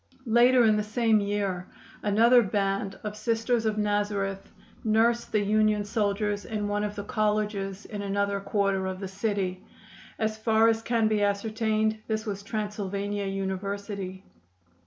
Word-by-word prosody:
Later 240 +2 +5
in 215 -1 +4
the - - +1
same 215 +1 +2
year 200 -3 -2 0.3
another 230 +4 +5
band 195 -1 -1
of 210 -1 -4
Sisters 225 +1 0
of 215 -1 0
Nazareth 205 -2 -1 0.3
nursed 230 +2 +2
the 215 - +2
Union 215 0 +2
soldiers 205 -1 -1
in 210 -2 -3
one 205 0 -1
of 210 0 -3
the 205 - -4
colleges 210 -2 -1
in 205 -1 -6
another 200 0 0
quarter 195 -1 0
of 185 0 -4
the 195 - -4
city. 195 -2 -2 0.5
As 220 0 -1
far 225 0 +4
as 225 0 +1
can 230 -1 +1
be 215 -1 +1
ascertained 215 +1 0
this 220 0 -2
was 200 -2 -4
Transylvania 205 -1 -3
University. 195 0 -4
210 Hz, 145 wpm, -27 LUFS, 200-220 Hz, 0.5 s, Later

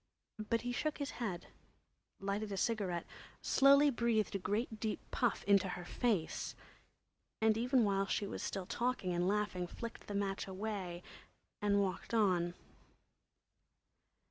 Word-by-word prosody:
But 230 -1 +2
he 245 - -2
shook 305 +5 -1
his 285 -1 -3
head, 190 -7 -2 0.7
lighted 200 +2 -2
a 195 - -2
cigarette, 190 -5 0 0.4
slowly 280 +2 +6
breathed 235 -3 +1
a 195 - -1
great 215 +4 -1
deep 220 -1 -1
puff 245 -4 +1
into 200 -2 +4
her 180 -1 -5
face, 205 -6 -1 0.8
and 220 0 +4
even 245 +2 +3
while 195 -1 +2
she 205 - 0
was - - -5
still 195 -2 -3
talking 235 -5 -1
and 175 +1 +1
laughing, 200 -3 0
flicked 230 +5 -7
the 205 - -4
match 195 -1 -1
away 190 -3 -4 0.6
and 200 -1 +3
walked 190 +4 -3
on. 180 -5 +2
205 Hz, 140 wpm, -36 LUFS, 190-230 Hz, 0.8 s, slowly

